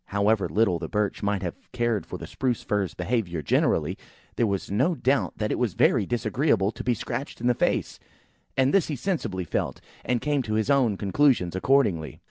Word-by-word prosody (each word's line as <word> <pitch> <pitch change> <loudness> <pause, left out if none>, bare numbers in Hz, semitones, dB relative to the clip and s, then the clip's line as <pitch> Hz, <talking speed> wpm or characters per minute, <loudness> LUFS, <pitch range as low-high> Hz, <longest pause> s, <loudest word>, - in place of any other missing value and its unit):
However 100 +1 +1
little 100 -5 +2
the 80 - -5
Birch 105 -1 -1
might 100 -1 -1
have 90 - -2 0.2
cared 120 -4 0
for - - -6
the - - -8
Spruce 125 -3 -2
fir's 100 -4 -1
behaviour 90 -5 -2
generally, - - +1 0.4
there 115 - +2
was 100 -1 -2
no 130 - +2
doubt 135 -1 0
that 105 -1 -1
it - - -1
was 120 -8 0
very 110 -7 +3
disagreeable 120 -4 +1
to - - -8
be 125 -1 +1
scratched 125 +5 -5
in 120 - -5
the 125 - +4
face; - - -1 0.6
and 135 +1 +3
this 195 - +3
he 150 - -2
sensibly 135 - -2
felt, 85 - -2 0.2
and 125 -1 0
came 145 +2 0
to 110 -3 -3
his 110 +5 +1
own 125 -8 +3
conclusions 100 -3 +2
accordingly. 95 - +1
110 Hz, 195 wpm, -26 LUFS, 95-130 Hz, 0.6 s, the